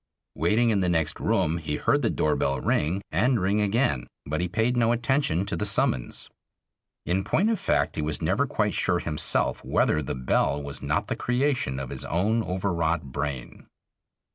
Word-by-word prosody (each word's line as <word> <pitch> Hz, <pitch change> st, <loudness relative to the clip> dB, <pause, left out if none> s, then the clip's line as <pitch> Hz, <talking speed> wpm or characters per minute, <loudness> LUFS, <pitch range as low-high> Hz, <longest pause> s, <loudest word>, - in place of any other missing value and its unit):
Waiting 110 Hz, -, +2 dB
in 105 Hz, -, +2 dB
the 90 Hz, -2 st, +1 dB
next 80 Hz, -3 st, 0 dB
room 80 Hz, +2 st, +1 dB
he 75 Hz, -2 st, -3 dB
heard -, -, +1 dB
the -, -, +1 dB
door 75 Hz, -1 st, +1 dB
bell 70 Hz, -1 st, 0 dB
ring, 85 Hz, +9 st, 0 dB
and 120 Hz, +9 st, +2 dB
ring 100 Hz, +3 st, +1 dB
again, 100 Hz, -, +1 dB, 0.2 s
but 80 Hz, +4 st, -2 dB
he 90 Hz, -, 0 dB
paid 115 Hz, +6 st, 0 dB
no 115 Hz, -1 st, +3 dB
attention 120 Hz, -, +1 dB
to 100 Hz, -, -3 dB
the -, -, -2 dB
summons. 100 Hz, -11 st, 0 dB, 0.8 s
In 95 Hz, +2 st, 0 dB
point 215 Hz, -, +2 dB
of 220 Hz, -, -1 dB
fact -, -, 0 dB
he -, -, 0 dB
was 75 Hz, 0 st, -1 dB
never -, -, +1 dB
quite -, -, 0 dB
sure -, -, +1 dB
himself 75 Hz, -, 0 dB
whether 75 Hz, -, +1 dB
the 70 Hz, -, -4 dB
bell 70 Hz, +2 st, +1 dB
was 70 Hz, -1 st, -6 dB
not -, -, 0 dB
the -, -, -3 dB
creation 125 Hz, -, 0 dB
of 65 Hz, -2 st, -6 dB
his -, -, -4 dB
own 105 Hz, +8 st, +1 dB
overwrought 85 Hz, -7 st, -1 dB
brain. 65 Hz, -3 st, -5 dB
90 Hz, 185 wpm, -26 LUFS, 75-110 Hz, 0.8 s, no